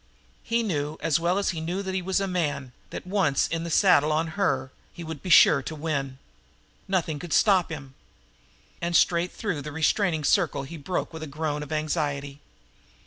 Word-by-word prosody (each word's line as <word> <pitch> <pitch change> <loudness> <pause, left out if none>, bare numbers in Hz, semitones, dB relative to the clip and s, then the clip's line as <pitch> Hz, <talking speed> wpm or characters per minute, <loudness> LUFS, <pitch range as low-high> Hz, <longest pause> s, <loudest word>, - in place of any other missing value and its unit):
He 230 0 0
knew, 150 -7 -2
as 165 -1 +1
well 175 +3 +1
as 200 - +1
he 165 -3 -5
knew 180 +5 -3
that 190 -1 -4
he 190 - -1
was 190 +2 0
a 195 - 0
man, 145 -8 -2 0.2
that, - - -7
once 185 -7 +1
in 165 0 -3
the 170 - -4
saddle 155 -4 +4
on 160 +2 0
her, 140 -8 -1 0.2
he 175 - -9
would 160 -3 -7
be 185 - -6
sure 150 -4 +7
to 155 - -6
win. 140 -4 -3 0.7
Nothing 170 -6 -1
could 175 0 -5
stop 190 -5 +4
him. 145 -4 -7 0.9
And 170 0 -1
straight 170 +1 +3
through 200 -9 -3
the 150 +2 -7
restraining 160 +2 +1
circle 165 -5 +2
he 160 +5 -8
broke 165 +3 -3
with 160 - -7
a 160 - -5
groan 150 0 -3
of 150 +1 -8
anxiety. 145 -2 -2
160 Hz, 195 wpm, -26 LUFS, 145-180 Hz, 0.9 s, sure